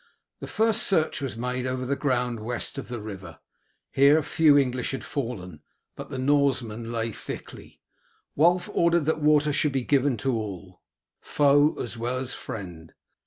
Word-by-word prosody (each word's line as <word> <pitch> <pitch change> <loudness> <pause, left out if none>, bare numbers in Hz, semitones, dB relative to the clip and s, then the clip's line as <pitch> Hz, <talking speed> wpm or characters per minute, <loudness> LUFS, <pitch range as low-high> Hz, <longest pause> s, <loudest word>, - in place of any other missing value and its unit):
The - - -7
first 220 0 +2
search 160 -6 +1
was 135 -4 -4
made 125 +1 -2
over 130 0 -3
the 140 +2 0
ground 125 -4 -1
west 120 +3 -4
of - - -8
the 120 -1 -5
river. 95 -5 -9 0.5
Here 145 +3 +5
few 150 0 +4
English 125 -3 0
had 135 - -4
fallen, 100 - -5 0.3
but - - -9
the 135 - -5
Norsemen 130 -5 0
lay 115 -1 -2
thickly. - - -9 0.6
Wulf 175 +4 +3
ordered 170 -2 +2
that 160 0 0
water 150 0 +3
should 145 0 +1
be 135 -2 0
given 140 -1 +2
to 130 +4 -1
all, 95 -4 -6 0.4
foe 145 +1 +3
as 115 -1 -5
well 120 +2 -2
as 130 0 -3
friend. 85 -6 -8
130 Hz, 165 wpm, -26 LUFS, 115-145 Hz, 0.6 s, Here